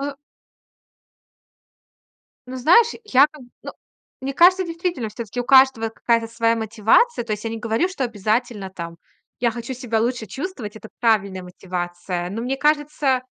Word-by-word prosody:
Э - - -3 2.5
Ну, 260 - -5
знаешь, 360 - +5
я 280 -8 +5
как 300 -3 -14
бы 245 - -17
ну, - - -7 0.5
мне 270 +1 -3
кажется, 365 +5 +5
действительно, 335 -7 -3
всё-таки 230 +1 -7
у - - -3
каждого 260 -4 +5
какая-то 230 0 0
своя 230 0 +1
мотивация. 225 - +2
То 225 - -3
есть 210 - -10
я 225 - -2
не 225 - -5
говорю, 230 +9 0
что 370 -8 -3
обязательно 215 -2 -2
там 170 -2 -8 0.4
Я 240 -1 +2
хочу 235 +3 -6
себя 235 -3 -2
лучше 240 0 -1
чувствовать. 255 - -6
Это 220 0 -11
правильная 200 -5 +1
мотивация. 175 0 -5
Но 220 +4 -4
мне 260 +3 -2
кажется, 295 -3 +1
235 Hz, 155 wpm, -22 LUFS, 215-275 Hz, 2.5 s, знаешь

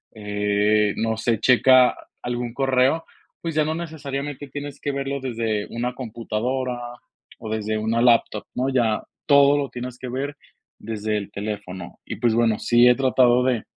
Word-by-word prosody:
eh, 105 0 +1
no 115 0 0
sé, 115 -1 0
checa 130 +2 +5 0.3
algún 120 -1 -3
correo, 135 +4 +2 0.4
pues, 165 -1 -3
ya 155 - +3
no 155 +1 -1
necesariamente 145 -4 -5
tienes 145 +1 -7
que 145 - -1
verlo 140 0 -3
desde 115 -5 -2
una 120 +2 -3
computadora 125 +1 -3 0.6
o 110 - -7
desde 110 0 -1
una 110 +2 0
laptop, 115 -3 +3
¿no? 130 +1 0
Ya 120 -5 +1 0.2
todo 140 0 +6
lo 140 -2 -2
tienes 125 0 -7
que 130 - -6
ver 140 +3 -3 0.4
desde 110 -1 -3
el 100 -1 -6
teléfono. 100 -4 -6
Y, - - -5
pues 120 -2 +2
bueno, 115 -2 +2
sí 120 +1 +5
he 125 - +6
tratado 125 -2 +3
de 125 -4 +1
120 Hz, 160 wpm, -23 LUFS, 110-135 Hz, 0.6 s, todo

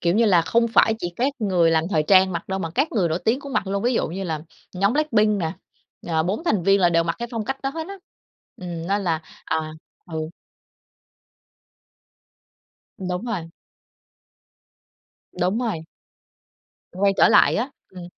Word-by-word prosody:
kiểu 170 +1 +1
như 230 - +4
là, 180 -6 +4
không 230 +7 +2
phải 220 -1 +4
chỉ 175 -3 -4
các 270 +4 +1
người 180 -7 +2
làm 160 0 +2
thời 155 - +2
trang 190 +3 +5
mặc 170 +1 -5
đâu 190 - -2
mà 165 -4 -3
các 275 - 0
người 190 -7 +1
nổi 160 +2 -1
tiếng 245 +5 +2
cũng 280 -1 -8
mặc 200 - 0
luôn. 200 +1 -2
Ví 245 +1 +1
dụ - - +1
như 190 +4 -5
là 160 -4 -3 0.3
nhóm 200 +4 +2
Blackpink 215 -9 +2
nè, 160 -1 -1 0.5
à, 160 -2 +1
4 195 - -2
thành 210 - +1
viên 195 +2 +4
là 175 - +5
đều 165 -1 +3
mặc 165 - -2
cái 235 0 -4
phong 230 -3 -3
cách 270 +4 -4
đó 270 - -1
hết 320 +2 -5
á. 395 - -6 0.6
Ừm, 170 -2 -6
nên 200 +2 0
là 165 -3 0 0.2
à, 155 -1 -2 0.4
ừ. 155 0 -3 2.7
Đúng 180 +2 -3
rồi. 190 -9 -4 1.9
Đúng 185 +5 +1
rồi. 215 -10 -2 1.1
Quay 195 +2 +2
trở - - +6
lại - - +5
á. 250 +6 -1 0.2
Ừm. 180 -2 -9
190 Hz, 180 wpm, -23 LUFS, 170-225 Hz, 2.7 s, trở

